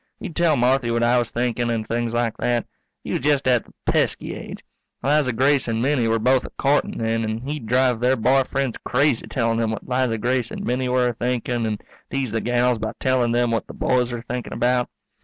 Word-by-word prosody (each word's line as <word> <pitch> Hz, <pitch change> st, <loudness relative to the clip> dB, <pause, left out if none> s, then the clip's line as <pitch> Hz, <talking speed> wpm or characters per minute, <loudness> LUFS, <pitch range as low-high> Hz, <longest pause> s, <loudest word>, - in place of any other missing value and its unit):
He'd 160 Hz, -, -7 dB
tell 170 Hz, -4 st, +3 dB
Marthy 125 Hz, 0 st, +2 dB
what 115 Hz, 0 st, +1 dB
I 120 Hz, +1 st, +4 dB
was 120 Hz, -1 st, -1 dB
thinkin' 120 Hz, 0 st, -1 dB
and 110 Hz, -2 st, -2 dB
things 120 Hz, 0 st, -1 dB
like 120 Hz, -1 st, 0 dB
that. 120 Hz, -1 st, 0 dB, 0.4 s
He -, -, -5 dB
was -, -, 0 dB
just 140 Hz, -1 st, +1 dB
at 125 Hz, -3 st, +3 dB
the -, -, -19 dB
pesky -, -, 0 dB
age. -, -, -8 dB, 0.4 s
Liza 145 Hz, -1 st, +2 dB
Grace 135 Hz, +4 st, +2 dB
and 115 Hz, -1 st, -1 dB
Minnie 130 Hz, -1 st, +1 dB
were 115 Hz, 0 st, +2 dB
both 125 Hz, +3 st, +2 dB
a -, -, -7 dB
courtin' 140 Hz, +1 st, +1 dB
then, 115 Hz, 0 st, 0 dB
and 110 Hz, +2 st, -3 dB
he'd 145 Hz, -6 st, -4 dB
drive 125 Hz, 0 st, +2 dB
their 125 Hz, +2 st, +3 dB
boy 130 Hz, +3 st, +3 dB
friends 135 Hz, -3 st, -1 dB
crazy 140 Hz, -2 st, +1 dB
telling 115 Hz, -2 st, 0 dB
them 115 Hz, -1 st, +1 dB
what 110 Hz, -, -5 dB
Liza 125 Hz, -2 st, 0 dB
Grace 120 Hz, +1 st, 0 dB
and -, -, -6 dB
Minnie 125 Hz, +1 st, -1 dB
were 125 Hz, -1 st, +2 dB
a -, -, -3 dB
thinking 120 Hz, -1 st, -1 dB
and 105 Hz, -1 st, -4 dB, 0.3 s
tease 135 Hz, -4 st, -2 dB
the 110 Hz, 0 st, -1 dB
gals 120 Hz, 0 st, +1 dB
by 110 Hz, 0 st, -3 dB
telling 130 Hz, -3 st, +2 dB
them 120 Hz, 0 st, +2 dB
what 115 Hz, -, -1 dB
the -, -, -10 dB
boys 125 Hz, -1 st, +1 dB
were 120 Hz, -1 st, -5 dB
thinking 125 Hz, 0 st, -5 dB
about. 125 Hz, 0 st, +1 dB
120 Hz, 225 wpm, -22 LUFS, 115-130 Hz, 0.4 s, I